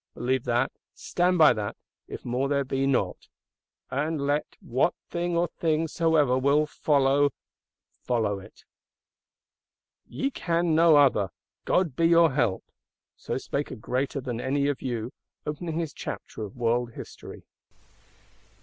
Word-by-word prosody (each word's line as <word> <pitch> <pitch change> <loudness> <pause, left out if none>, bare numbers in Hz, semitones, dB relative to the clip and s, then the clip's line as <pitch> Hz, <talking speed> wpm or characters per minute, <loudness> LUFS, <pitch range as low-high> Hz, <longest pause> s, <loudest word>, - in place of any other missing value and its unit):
Believe 130 +1 -1
that, 120 +1 +1 0.2
stand 180 +1 +1
by 155 -3 +7
that, 105 -1 -4 0.3
if - - -8
more 125 +3 -1
there 140 -1 +1
be 135 +1 0
not; 135 - 0 0.6
and 150 +3 -1
let 145 +2 -1
what 130 +8 0 0.2
thing 175 0 -1
or 175 +1 +2
things 160 -1 -1
soever 155 -6 +3
will 140 +3 +3
follow 145 -1 +2
it 140 - 0 0.7
follow. 105 -5 -1 1.6
"Ye 275 +1 -2
can 170 -6 0
no 165 0 +6
other; 130 -9 +4 0.4
God 170 -8 +1
be 165 +2 +3
your 165 -2 +5
help!" 120 -8 0 0.5
So - - -4
spake 140 +1 -3
a - - -6
greater 130 +5 -2
than 125 -3 -4
any 140 +2 0
of 145 - -3
you; 120 -2 -3 0.3
opening 155 +2 -4
his 165 -3 -2
Chapter - - -7
of 100 - -11
World 120 0 0
History. - - -10
140 Hz, 140 wpm, -27 LUFS, 125-160 Hz, 1.6 s, by